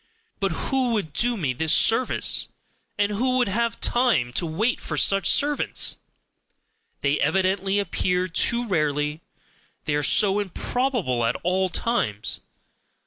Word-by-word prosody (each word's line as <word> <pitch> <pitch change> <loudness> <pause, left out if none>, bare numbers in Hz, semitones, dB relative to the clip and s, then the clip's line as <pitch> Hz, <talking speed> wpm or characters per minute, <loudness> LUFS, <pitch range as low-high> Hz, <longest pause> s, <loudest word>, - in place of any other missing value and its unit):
But 195 -2 0
who 255 +6 -1
could 160 -8 -3
do 240 0 +1
me 145 -9 -1
this 160 +5 +1
service! 235 +3 +2 0.5
And 205 0 +1
who 255 +5 0
would 245 - +2
have 230 +3 -1
time 235 - +1
to 170 - -1
wait 215 +10 -1
for - - -5
such 195 -1 +3
servants! 290 0 +1 1.0
they 140 +1 +1
evidently 190 +4 0
appear 180 -1 -1
too 235 +7 +1
rarely, 150 -3 -1 0.6
they 150 - -1
are 145 - +1
so 195 +7 +4
improbable 205 - -2
at 115 +2 0
all 185 +2 0
times! 110 - -1
195 Hz, 135 wpm, -23 LUFS, 155-235 Hz, 1.0 s, so